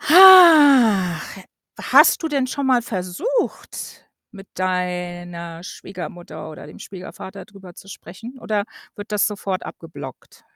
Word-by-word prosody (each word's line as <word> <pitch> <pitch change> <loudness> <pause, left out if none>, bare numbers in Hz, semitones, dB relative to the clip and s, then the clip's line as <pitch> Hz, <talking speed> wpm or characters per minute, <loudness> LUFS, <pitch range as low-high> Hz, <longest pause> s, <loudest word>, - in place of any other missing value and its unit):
Hach, 290 - +6 0.4
hast - - +4
du 320 - -2
denn 275 -3 -1
schon 280 +1 -4
mal 250 -2 +2
versucht, 230 - -5 0.2
mit 195 -3 -14
deiner 175 -2 -5
Schwiegermutter 175 -4 -10
oder 155 - -12
dem - - -14
Schwiegervater 190 +1 -11
drüber 195 -4 -16
zu 195 - -16
sprechen 225 +9 -12
oder 210 -3 -3 0.3
wird 205 -1 -11
das 205 -1 +1
sofort 200 -2 -5
abgeblockt? 145 -6 -12
195 Hz, 120 wpm, -20 LUFS, 175-255 Hz, 0.4 s, Hach